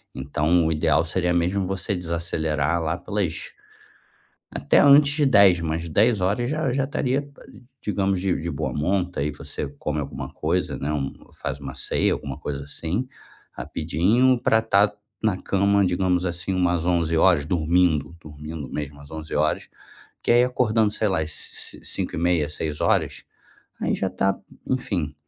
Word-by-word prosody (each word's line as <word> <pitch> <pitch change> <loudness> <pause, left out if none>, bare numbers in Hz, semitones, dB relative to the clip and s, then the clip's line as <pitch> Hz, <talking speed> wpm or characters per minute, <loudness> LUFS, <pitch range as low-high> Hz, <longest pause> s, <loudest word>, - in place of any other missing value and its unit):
Então 75 +5 +1
o - - +1
ideal 80 0 +2
seria 90 +1 0
mesmo 90 +3 +1
você 95 +2 -2
desacelerar 85 -2 -1
lá 80 +2 -1
pelas 100 -4 -3 1.0
até 70 - +2
antes 145 0 +7
de 150 -1 +2
10, 100 -8 +6
mas 80 +1 -3
22h 105 +4 +2
já 155 -3 0
já 135 +1 +1
estaria, 140 -1 -1 0.6
digamos, 100 -2 0
de 95 -1 +1
de 85 - -3
boa 75 +1 -3
monta. 90 +3 -1
Aí 75 +1 0
você 75 0 -6
come 75 0 -2
alguma 70 -1 -5
coisa, - - -1
né, 70 +2 -3
um 70 -2 -2 0.2
faz 70 0 -5
uma 70 -2 -7
ceia, - - +1
alguma - - -5
coisa 70 -1 -4
assim, 85 - -3 0.5
rapidinho 105 - +1
para 110 - +4
estar 105 -2 +3 0.3
na 110 -4 +2
cama, 100 +1 +2
digamos 90 0 +1
assim, 90 +2 -3
umas 90 -2 +1
23h, 85 -2 +3
dormindo. 85 -1 +1
Dormindo 75 -1 -8
mesmo, 70 -1 -5
às 70 - -14
23h, 75 -1 -1 0.6
que - - -1
aí 120 +1 +6
acordando, 115 -4 +2
sei 110 - 0
lá, 95 -4 +1
às 80 0 -3
ci - - -6
ci - - -21
cinco - - -3
e - - -2
meia, 85 -3 +2
6h 75 0 -1 0.6
aí - - 0
já 95 - -1
tá 95 +1 0 0.3
enfim, 95 - -1
85 Hz, 155 wpm, -24 LUFS, 75-100 Hz, 1.0 s, antes